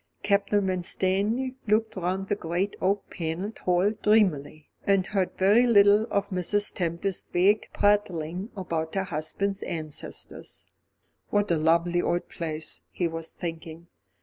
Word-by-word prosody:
Captain 200 0 +2
Winstanley 195 +7 0
looked 220 +1 +1
round 190 +1 -2
the 205 - +1
great 180 +2 -2
oak 195 +1 0
panelled 175 +5 -4
hall 180 +3 +2
dreamily, 180 -9 +1 0.2
and 195 -2 +2
heard 190 -3 -1
very 210 +6 +5
little 205 -1 +6
of 200 0 0
Mrs. 200 +3 0
Tempest's 175 +2 -2
vague 200 +4 +3
prattling 195 -2 0
about 165 -3 -3
her 195 - +1
husband's 190 +4 -3
ancestors. 155 -3 -6 0.6
What 205 -2 +1
a 170 - +3
lovely 170 +2 +2
old 175 0 -1
place, 160 -2 -4
he 175 - -1
was 165 0 -5
thinking. 165 0 -7
185 Hz, 130 wpm, -27 LUFS, 170-205 Hz, 0.6 s, little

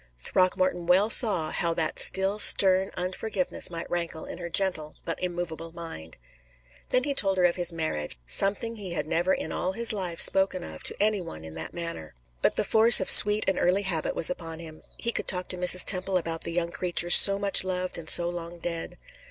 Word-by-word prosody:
Throckmorton 185 - -2
well 195 +5 +1
saw 180 -12 +3
how 170 -1 -3
that 160 -2 -3
still 195 +2 +3
stern 190 -1 +5
unforgiveness 185 +2 -2
might 165 -1 -9
rankle 170 -2 -6
in - - -11
her 170 -1 -8
gentle 170 -4 -2
but 165 -2 -7
immovable 175 -2 -7
mind. 165 - -10 0.7
Then 255 - 0
he 285 - -3
told 195 -7 0
her 180 - +1
of 175 - 0
his 175 -1 +1
marriage 75 - -6
something 200 - -1
he 190 -4 -8
had 170 - -5
never 170 +4 -3
in - - -4
all 185 +1 -5
his 230 +2 +1
life 180 -5 -6
spoken 190 -2 +1
of - - -11
to - - +1
any 210 -1 -1
one 80 - -11
in 80 - -11
that 80 +1 -8
manner; 170 - -7 0.3
but - - -1
the - - -2
force 225 +1 +5
of 190 - +6
sweet 210 +1 +7
and 190 -1 -2
early 185 +3 -1
habit 170 -5 -5
was 170 - +2
upon 165 -2 -8
him 160 -1 -14 0.2
he 235 - -4
could - - -6
talk 180 -1 0
to - - -1
Mrs. 180 0 +4
Temple 185 0 +2
about 165 -2 -6
the 170 - -3
young 170 0 -4
creature 175 -1 -3
so 195 +2 +9
much 200 -1 0
loved 185 -1 -6
and 160 - -9
so 170 -1 +1
long 175 0 -9
dead. 170 -1 -7
180 Hz, 210 wpm, -24 LUFS, 165-190 Hz, 0.7 s, so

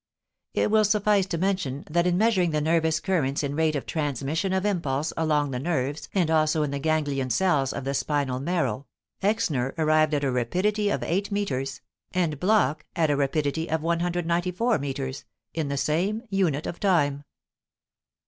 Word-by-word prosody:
It - - +1
will 215 0 +5
suffice 210 -2 +2
to 170 - -2
mention 175 -7 -1
that 170 +3 +1
in 175 0 +2
measuring 200 -5 +3
the 155 -1 0
nervous 160 0 +2
currents 155 -6 0
in 140 0 -2
rate 160 0 +1
of 140 - -3
transmission 150 - -2
of 190 +1 0
impulse 160 -7 -1
along 150 -3 +1
the 125 - -2
nerves 145 -1 -2
and 175 -4 +2
also 155 -1 +3
in 145 - -2
the 140 - -2
ganglion 145 -3 0
cells 140 -2 +2
of 140 - -5
the 135 +1 -2
spinal 140 -1 -1
marrow, 155 -2 -1 0.3
Exner 155 - 0
arrived 155 -1 +3
at 145 - -1
a 135 - +1
rapidity 190 - 0
of - - -1
eight 195 +5 -1
meters, 135 -10 -2 0.3
and 165 -6 0
Bloch 180 -7 +2
at 160 -3 +2
a - - +2
rapidity 145 +3 -1
of 160 0 -1
194 175 +5 0
meters, 135 -1 -4 0.3
in 160 -3 -2
the 140 0 -2
same 185 - 0
unit 170 -7 +1
of 175 - -5
time. 145 -8 +2
155 Hz, 170 wpm, -26 LUFS, 140-180 Hz, 0.3 s, will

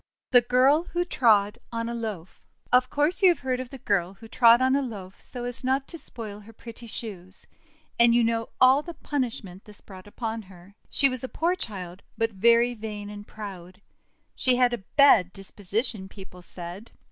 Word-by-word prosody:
THE 245 -2 +7
GIRL 260 +7 +3
WHO 350 0 0
TROD 220 - +2
ON 230 0 -3
A 235 - -4
LOAF 215 -7 -6 0.3
OF 250 +1 +4
course 295 +8 0
you 380 - +7
have 345 - +1
heard 255 -2 -1
of 255 -1 -6
the 270 - -9
girl 195 -5 -1
who 225 +3 -13
trod 235 +1 +6
on 260 +1 +3
a 280 - +2
loaf, 200 -7 -8
so 245 -2 -8
as 245 0 -4
not 265 +1 0
to 335 - -8
spoil 215 -6 -8
her 215 +2 -15
pretty 230 +1 -11
shoes; 190 -5 -7 0.5
and 235 0 +6
you 240 - +4
know 230 0 -1
all 260 +2 +6
the 340 +2 -9
punishment 225 -9 -4
this 210 -1 -12
brought 190 -1 -13
upon 225 +1 -4
her. 185 -1 -16 0.2
She 275 - +3
was 255 -2 -4
a 260 - -4
poor 335 +3 0
child, 190 - -6 0.2
but 225 0 0
very 235 +4 +3
vain 210 -2 -7
and 205 0 -10
proud. 185 -4 -9 0.6
She 255 -1 +2
had 245 -1 +3
a 240 - -2 0.2
bad 210 -11 +6
disposition, 200 +1 -4
people 190 -2 -12
said. 175 +5 -8
230 Hz, 195 wpm, -26 LUFS, 200-255 Hz, 0.6 s, THE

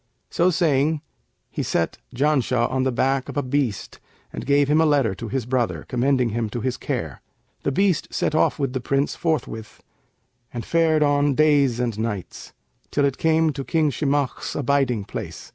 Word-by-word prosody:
So 175 +2 +3
saying 155 -3 +1 0.5
he - - -3
set 85 - -1 0.2
Janshah 130 -3 +1
on 130 0 0
the 130 0 +1
back 135 +2 0
of - - -6
a 145 - +1
beast 130 -5 -2 0.3
and - - -6
gave 140 0 +4
him 150 +2 +3
a - - +4
letter 140 -9 +2
to 115 +4 -7
his 130 +1 -2
brother, 125 -1 -1
commending 125 0 +1
him 115 0 -2
to 120 +3 -4
his 125 0 -1
care. - - -4 0.4
The - - -1
beast 190 +2 +1
set - - -1
off 155 - +2
with 135 -4 -2
the 130 - -2
Prince 140 +3 0
forthwith 145 -9 -3 0.7
and 120 -2 -5
fared 160 -2 +3
on 145 -1 +2
days 145 -5 +3
and 115 -4 -2
nights, 105 -5 -5 0.4
till 145 - +1
it 140 -2 -1
came 160 -1 +2
to 135 0 -5
King 155 0 +1
Shimakh's 145 -2 -1
abiding 135 -6 +1
place. - - -7
140 Hz, 180 wpm, -23 LUFS, 125-150 Hz, 0.7 s, gave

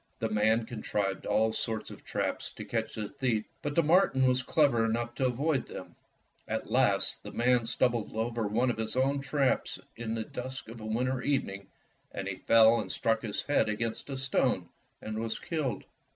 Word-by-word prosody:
The 115 - -1
man 110 +2 +2
contrived 105 -4 -2
all 110 +1 +2
sorts 110 -1 -2
of - - -11
traps - - -2
to - - -8
catch 115 -1 -2
the 105 -2 -3
thief, 120 -4 -1 0.2
but 145 0 -3
the 170 - +4
marten 150 -5 +4
was 130 0 +3
clever 130 -4 +3
enough 120 +1 -1
to 130 +1 +1
avoid 135 +2 0
them. - - -9 0.5
At - - -3
last, - - +2
the - - -8
man 120 -1 +2
stumbled 120 -2 +1
over 115 0 -1
one 120 +5 +2
of - - -6
his 110 +1 -2
own 135 +2 +2
traps 140 -1 0 0.2
in 115 -1 -3
the 110 - -2
dusk 125 +1 -6
of 115 0 -9
a - - -7
winter 125 +3 0
evening, 100 -9 -1 0.4
and - - -5
he - - -3
fell 115 0 +6
and - - -4
struck 115 -1 +1
his 105 -3 -2
head 145 -6 +2
against 115 +4 -3
a 135 - -3
stone 130 -9 +1 0.3
and 110 0 -4
was 115 0 -2
killed. 140 - -2
115 Hz, 190 wpm, -30 LUFS, 110-130 Hz, 0.5 s, fell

